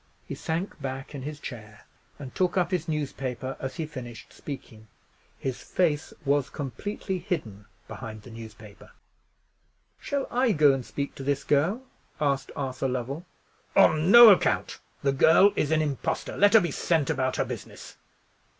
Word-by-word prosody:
He -, -, -5 dB
sank 165 Hz, 0 st, -4 dB
back 135 Hz, +1 st, -5 dB
in 140 Hz, -, -6 dB
his 150 Hz, +2 st, -6 dB
chair, 105 Hz, -6 st, -10 dB, 0.3 s
and 135 Hz, -3 st, -9 dB
took 185 Hz, 0 st, 0 dB
up 180 Hz, 0 st, +1 dB
his 175 Hz, -3 st, -1 dB
newspaper 135 Hz, -4 st, -3 dB
as 130 Hz, -1 st, -5 dB
he 165 Hz, -, -3 dB
finished 120 Hz, -6 st, -9 dB
speaking. 110 Hz, -6 st, -9 dB, 0.5 s
His 130 Hz, -2 st, -4 dB
face 155 Hz, -5 st, 0 dB
was 140 Hz, -1 st, +1 dB
completely 185 Hz, +7 st, -4 dB
hidden 115 Hz, -, -5 dB, 0.2 s
behind 110 Hz, -3 st, -8 dB
the 120 Hz, -, -12 dB
newspaper. 110 Hz, -2 st, -12 dB, 1.1 s
"Shall 280 Hz, -1 st, -2 dB
I 245 Hz, -2 st, +2 dB
go 150 Hz, -4 st, +5 dB
and 135 Hz, -1 st, -3 dB
speak 140 Hz, +3 st, -5 dB
to 135 Hz, -, -8 dB
this 140 Hz, 0 st, -1 dB
girl?" 170 Hz, -, +1 dB, 0.4 s
asked 140 Hz, -2 st, 0 dB
Arthur 135 Hz, -1 st, -2 dB
Lovell. 130 Hz, +7 st, -4 dB, 0.5 s
"On 155 Hz, +3 st, +5 dB
no 235 Hz, +2 st, +11 dB
account! 190 Hz, -, +1 dB, 0.2 s
The 140 Hz, -, +3 dB
girl 165 Hz, +8 st, +6 dB
is 145 Hz, -, 0 dB
an 155 Hz, 0 st, +2 dB
impostor. 140 Hz, -4 st, -3 dB
Let 205 Hz, +2 st, +5 dB
her 225 Hz, -, +9 dB
be 170 Hz, -4 st, -2 dB
sent 160 Hz, 0 st, +1 dB
about 130 Hz, -3 st, -1 dB
her -, -, 0 dB
business!" -, -, -9 dB
145 Hz, 160 wpm, -27 LUFS, 130-170 Hz, 1.1 s, no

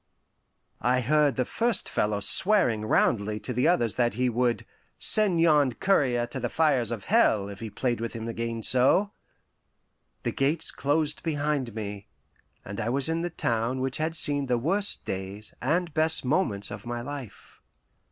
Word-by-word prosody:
I 125 Hz, +2 st, +2 dB
heard 145 Hz, +1 st, +2 dB
the 125 Hz, -, 0 dB
first 230 Hz, -4 st, 0 dB
fellow 105 Hz, -1 st, -1 dB
swearing 120 Hz, -, +3 dB
roundly 105 Hz, -1 st, +1 dB
to 125 Hz, -, -5 dB
the 125 Hz, +5 st, +1 dB
others 120 Hz, -, +1 dB
that 120 Hz, -3 st, +1 dB
he 125 Hz, +1 st, +1 dB
would 120 Hz, 0 st, 0 dB, 0.3 s
"send 205 Hz, -6 st, +4 dB
yon 150 Hz, -6 st, +3 dB
courier 125 Hz, -7 st, +1 dB
to 120 Hz, -1 st, -5 dB
fires 135 Hz, -8 st, +1 dB
of 115 Hz, -4 st, -5 dB
hell, 110 Hz, -, +2 dB
if 100 Hz, -, -9 dB
he 115 Hz, -, -6 dB
played 120 Hz, +1 st, -2 dB
with 115 Hz, -, -4 dB
him 115 Hz, -1 st, -6 dB
again 115 Hz, 0 st, -4 dB
so." 135 Hz, -, +3 dB, 1.1 s
The -, -, -1 dB
gates 150 Hz, +4 st, 0 dB
closed 150 Hz, +1 st, -1 dB
behind 145 Hz, -6 st, -2 dB
me, 105 Hz, -2 st, -6 dB, 0.6 s
and 100 Hz, 0 st, -6 dB
I 110 Hz, -, -2 dB
was 135 Hz, +4 st, -1 dB
in 165 Hz, +1 st, -1 dB
the 175 Hz, -, -2 dB
town 115 Hz, -5 st, -1 dB
which 130 Hz, 0 st, -2 dB
had 160 Hz, +1 st, -2 dB
seen 145 Hz, -3 st, +3 dB
the 125 Hz, -1 st, +1 dB
worst 195 Hz, -, 0 dB
days 95 Hz, +2 st, -6 dB
and 165 Hz, +5 st, -1 dB
best 160 Hz, -2 st, +2 dB
moments 125 Hz, -, -1 dB
of 105 Hz, 0 st, -8 dB
my 120 Hz, 0 st, -4 dB
life. 135 Hz, -3 st, -9 dB
125 Hz, 165 wpm, -26 LUFS, 115-155 Hz, 1.1 s, send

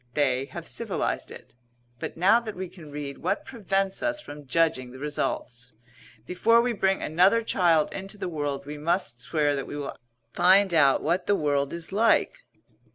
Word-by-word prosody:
They 135 Hz, -3 st, +1 dB
have -, -, -9 dB
civilized -, -, -2 dB
it. -, -, -12 dB, 0.5 s
But -, -, -6 dB
now 195 Hz, +7 st, +5 dB
that 220 Hz, -3 st, -7 dB
we 185 Hz, -1 st, -5 dB
can 170 Hz, -4 st, -13 dB
read, 145 Hz, -1 st, -6 dB
what 305 Hz, -, -2 dB
prevents 195 Hz, -5 st, -1 dB
us 305 Hz, 0 st, -1 dB
from 145 Hz, -, -11 dB
judging 160 Hz, -4 st, +1 dB
the 130 Hz, -, -11 dB
results? 125 Hz, -4 st, -4 dB, 0.5 s
Before 225 Hz, -, +3 dB
we 240 Hz, 0 st, +1 dB
bring 195 Hz, -2 st, 0 dB
another 185 Hz, +9 st, +3 dB
child 170 Hz, -7 st, +2 dB
into 195 Hz, +2 st, -5 dB
the -, -, -4 dB
world 145 Hz, -4 st, -3 dB
we 150 Hz, +1 st, -7 dB
must 150 Hz, -7 st, -1 dB
swear 145 Hz, +1 st, 0 dB
that 135 Hz, -, -4 dB
we 145 Hz, -, -6 dB
will 145 Hz, -1 st, -5 dB, 0.4 s
find 190 Hz, +1 st, +5 dB
out 140 Hz, -4 st, +4 dB
what 175 Hz, +3 st, 0 dB
the 205 Hz, -, +3 dB
world 145 Hz, -4 st, 0 dB
is 170 Hz, +1 st, -6 dB
like." 230 Hz, -, +2 dB
165 Hz, 175 wpm, -26 LUFS, 145-195 Hz, 0.5 s, now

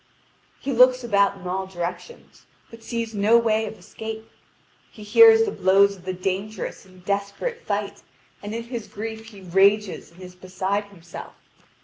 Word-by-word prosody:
He 275 Hz, -, -3 dB
looks 255 Hz, 0 st, +5 dB
about 200 Hz, -3 st, +2 dB
in 185 Hz, -, -13 dB
all 190 Hz, +1 st, -2 dB
directions, 180 Hz, -, -7 dB, 0.2 s
but 230 Hz, 0 st, -12 dB
sees 230 Hz, -1 st, -4 dB
no 210 Hz, +3 st, +4 dB
way 220 Hz, -1 st, +1 dB
of 220 Hz, -, -8 dB
escape. 220 Hz, 0 st, -8 dB, 0.6 s
He 215 Hz, -, -12 dB
hears 450 Hz, -, +7 dB
the 430 Hz, -, -1 dB
blows 200 Hz, -, +4 dB
of 180 Hz, -2 st, -18 dB
the 185 Hz, -, -2 dB
dangerous 195 Hz, +4 st, -4 dB
and 185 Hz, -1 st, -19 dB
desperate 200 Hz, -, -3 dB
fight, -, -, -3 dB, 0.4 s
and 205 Hz, +2 st, -6 dB
in 230 Hz, -, -4 dB
his 235 Hz, -2 st, -6 dB
grief 220 Hz, +1 st, -7 dB
he 205 Hz, -3 st, -13 dB
rages 195 Hz, +3 st, +2 dB
and 170 Hz, -, -20 dB
is 180 Hz, 0 st, -10 dB
beside 190 Hz, +3 st, -3 dB
himself. 175 Hz, -4 st, -11 dB
205 Hz, 160 wpm, -23 LUFS, 190-225 Hz, 0.6 s, hears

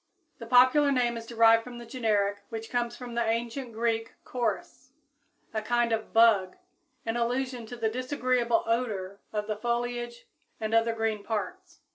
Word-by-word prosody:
The 230 Hz, -, -8 dB
popular 255 Hz, +4 st, +5 dB
name 245 Hz, -3 st, +1 dB
is 230 Hz, 0 st, -7 dB
derived 230 Hz, -1 st, +5 dB
from 245 Hz, 0 st, -9 dB
the 240 Hz, -, -9 dB
generic, 210 Hz, -5 st, 0 dB
which 225 Hz, -1 st, -6 dB
comes 240 Hz, -1 st, -1 dB
from 245 Hz, -2 st, -8 dB
the 235 Hz, 0 st, +1 dB
ancient 235 Hz, +3 st, -2 dB
Greek 225 Hz, 0 st, -1 dB
Koris, 245 Hz, +2 st, -3 dB, 0.6 s
a 220 Hz, -, -1 dB
kind 240 Hz, +1 st, +1 dB
of 220 Hz, -1 st, -2 dB
bug, 215 Hz, -5 st, +4 dB, 0.5 s
in 225 Hz, +1 st, -1 dB
allusion 245 Hz, 0 st, -1 dB
to 245 Hz, -, -7 dB
the 230 Hz, -2 st, -1 dB
disagreeable 250 Hz, -1 st, 0 dB
odor 210 Hz, -5 st, -2 dB
of 210 Hz, -1 st, -2 dB
the 215 Hz, -1 st, -3 dB
foliage 240 Hz, +1 st, -3 dB, 0.3 s
and 220 Hz, 0 st, -3 dB
other 230 Hz, 0 st, +3 dB
green 225 Hz, -2 st, -1 dB
parts. 335 Hz, -, -5 dB
235 Hz, 160 wpm, -28 LUFS, 225-245 Hz, 0.6 s, popular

